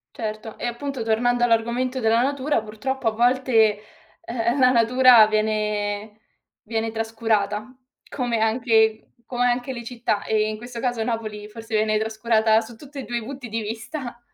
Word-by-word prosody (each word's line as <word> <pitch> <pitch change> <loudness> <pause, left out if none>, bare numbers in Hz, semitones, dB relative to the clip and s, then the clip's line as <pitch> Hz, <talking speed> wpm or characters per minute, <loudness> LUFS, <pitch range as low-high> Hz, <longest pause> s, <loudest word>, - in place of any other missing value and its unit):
Certo. 215 -2 -5
E - - -5
appunto 245 +1 -4
tornando 240 +2 +2
all'argomento 240 +3 0
della 225 +1 +3
natura, 280 0 0
purtroppo 225 +4 -4
a - - +4
volte, 245 +3 +1 0.7
eh-eh, 235 +2 -1
la 255 -1 +6
natura 245 -1 +6
viene 210 -1 -1 0.4
viene 225 0 -2
trascurata, 220 -2 -1 0.4
come 245 -4 -1
anche 220 -1 +2
come 245 -1 -1
anche 245 +2 0
le 235 -2 -7
città. 230 -4 -2
E 215 -1 +1
in 215 - -4
questo 240 +1 -8
caso 245 -3 -1
Napoli 220 -2 -3
forse 225 +1 -6
viene 215 0 +2
trascurata 220 0 +2
su 225 +1 -8
tutti 285 +4 -13
e - - -5
2 240 0 -3
i - - -9
punti 260 +1 -7
di 225 +1 -3
vista. 235 +4 -6
230 Hz, 160 wpm, -23 LUFS, 220-245 Hz, 0.7 s, la